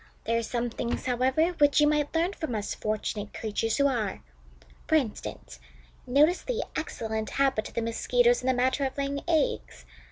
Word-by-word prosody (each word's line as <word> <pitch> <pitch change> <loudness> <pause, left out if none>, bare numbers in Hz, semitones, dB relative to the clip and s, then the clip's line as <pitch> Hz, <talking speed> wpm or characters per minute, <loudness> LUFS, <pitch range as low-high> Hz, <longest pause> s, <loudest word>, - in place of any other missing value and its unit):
There 230 - 0
are - - -1
some 240 +1 -2
things, 235 +1 -3
however, 260 +6 +2
which 290 0 +5
you 295 - +6
might 295 +1 +1
learn 340 +4 +1
from 315 - -4
us 205 -1 -2
fortunate 215 -1 -3
creatures 220 +1 -1
who 280 - +3
are. 230 -8 -1 0.6
For 315 - +3
instance, 235 - -3 0.5
notice 300 +8 +4
the - - -2
excellent 220 -8 -3
habit 270 -6 +1
of - - -15
the 235 - 0
Mosquitoes 480 - +2
in - - -4
the 260 - +4
matter 260 +3 +1
of 265 0 -2
laying 280 0 -2
eggs. 320 -4 0
260 Hz, 180 wpm, -28 LUFS, 225-300 Hz, 0.6 s, you